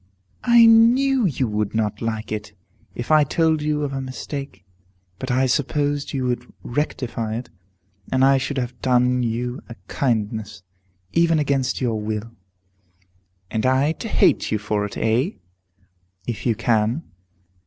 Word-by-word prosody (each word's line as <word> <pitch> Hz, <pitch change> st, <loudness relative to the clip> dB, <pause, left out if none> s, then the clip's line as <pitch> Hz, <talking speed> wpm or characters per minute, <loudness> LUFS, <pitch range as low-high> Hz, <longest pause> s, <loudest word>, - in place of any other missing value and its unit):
"I 235 Hz, -1 st, +7 dB
knew 240 Hz, +2 st, +5 dB
you 135 Hz, -5 st, -1 dB
would 105 Hz, 0 st, -2 dB
not 105 Hz, -2 st, -1 dB
like 110 Hz, -2 st, -3 dB
it, 105 Hz, -1 st, -5 dB, 0.4 s
if 120 Hz, +5 st, -4 dB
I 155 Hz, -1 st, +6 dB
told 160 Hz, +1 st, +1 dB
you 150 Hz, 0 st, 0 dB
of 140 Hz, -1 st, -3 dB
a 135 Hz, -, -2 dB
mistake. 135 Hz, -2 st, -7 dB, 0.5 s
But 130 Hz, -, -5 dB
I 130 Hz, +1 st, +2 dB
supposed 145 Hz, +2 st, 0 dB
you 130 Hz, -2 st, -2 dB
would 125 Hz, 0 st, -3 dB
rectify 120 Hz, -5 st, -2 dB
it, 120 Hz, +1 st, -6 dB, 0.6 s
and 130 Hz, 0 st, +4 dB
I 135 Hz, 0 st, +5 dB
should 140 Hz, +2 st, -3 dB
have 125 Hz, -1 st, -4 dB
done 125 Hz, 0 st, +2 dB
you 120 Hz, +1 st, -2 dB
a 115 Hz, -, -8 dB
kindness, 110 Hz, -5 st, -2 dB, 0.5 s
even 170 Hz, -1 st, +3 dB
against 135 Hz, -4 st, 0 dB
your 115 Hz, -4 st, 0 dB
will." 110 Hz, +1 st, -4 dB, 1.2 s
"And 110 Hz, -1 st, -1 dB
I 130 Hz, +4 st, +3 dB
to 195 Hz, -, -6 dB
hate -, -, +2 dB
you 110 Hz, -, +2 dB
for 105 Hz, 0 st, -1 dB
it, 105 Hz, -, -7 dB
eh?" 120 Hz, -, +1 dB, 0.9 s
"If 120 Hz, +1 st, -3 dB
you 115 Hz, -, +2 dB
can." 115 Hz, +7 st, +1 dB
125 Hz, 150 wpm, -22 LUFS, 110-145 Hz, 1.2 s, I